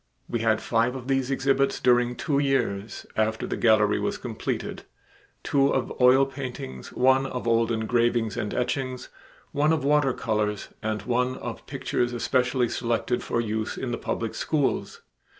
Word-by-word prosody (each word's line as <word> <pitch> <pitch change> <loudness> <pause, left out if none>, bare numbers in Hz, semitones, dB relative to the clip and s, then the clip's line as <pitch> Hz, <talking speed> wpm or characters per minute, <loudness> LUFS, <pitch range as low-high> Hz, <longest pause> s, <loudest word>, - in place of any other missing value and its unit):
We 120 - -2
had 110 -1 +2
five 120 +2 +1
of 130 -1 -7
these 135 -1 +1
exhibits 135 0 +1
during 125 0 +3
two 140 0 0
years, 120 -7 -1
after 110 0 0
the - - -3
gallery 110 -2 +3
was - - -1
completed: - - -4 0.6
two 140 -2 +3
of 130 -3 -1
oil 130 +2 +6
paintings, 125 - -7
one 130 +1 +3
of 125 -2 -5
old 115 0 +3
engravings 115 0 +1
and 110 -4 -3
etchings, 130 0 -2 0.4
one 150 +2 +2
of 160 -2 +1
water 145 -2 +3
colors, 105 -3 -1
and 110 0 -2
one 125 +1 0
of - - -7
pictures 120 0 -1
especially 125 +1 +1
selected 120 +1 -1
for - - -1
use 110 -1 -2
in 130 - -3
the - - -1
public 115 -1 -3
schools. 150 -4 -1
125 Hz, 155 wpm, -26 LUFS, 115-135 Hz, 0.6 s, oil